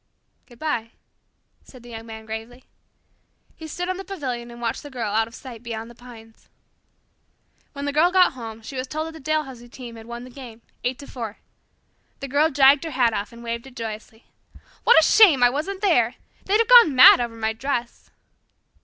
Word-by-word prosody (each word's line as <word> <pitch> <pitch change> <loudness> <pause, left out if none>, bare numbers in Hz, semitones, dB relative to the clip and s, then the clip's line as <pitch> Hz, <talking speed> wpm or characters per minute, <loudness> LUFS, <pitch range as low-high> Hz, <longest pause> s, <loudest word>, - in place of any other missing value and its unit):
"Goodbye," 240 -3 -4 0.7
said 255 -3 -16
the 240 - -12
Young 225 0 -9
Man 220 0 -9
gravely. 225 +3 -8 0.9
He 320 - -10
stood 355 +3 -4
on 370 0 -2
the 385 - -7
pavilion 260 -12 -5
and 235 0 -11
watched 235 -1 -3
the 290 - -10
Girl 235 -6 -4
out 220 +1 +1
of 230 - -14
sight 245 -5 -10
beyond 230 -1 -7
the - - -14
pines. 230 -2 -16 1.2
When 280 0 -6
the 285 - -2
Girl 315 +4 +4
got 370 -1 +4
home 225 -3 -9
she 270 - -9
was 255 0 -4
told 310 +3 -4
that 325 - -7
the 320 - -12
Dalhousie 265 -5 -3
team 240 -2 -10
had 225 0 -12
won 235 0 -7
the 255 - -12
game, 240 -3 -12 0.2
eight 250 +1 -1
to 285 - -11
four. 230 -6 -7 0.8
The 275 - -6
Girl 290 +4 +2
dragged 275 0 +5
her 330 - -4
hat 250 -5 +1
off 205 -1 -4
and 235 0 -13
waved 235 +2 -5
it 260 - -15
joyously. 220 0 -8 0.6
"What - - +7
a 320 - +4
shame 350 - +6
I 245 - +6
wasn't 375 +8 -4
there! 250 - +2 0.3
They'd 400 +2 +2
have 455 0 +2
gone 475 - +7
mad 255 -1 +9
over 235 -1 -4
my 220 -1 -2
dress." 245 0 -4
245 Hz, 200 wpm, -23 LUFS, 230-290 Hz, 1.2 s, mad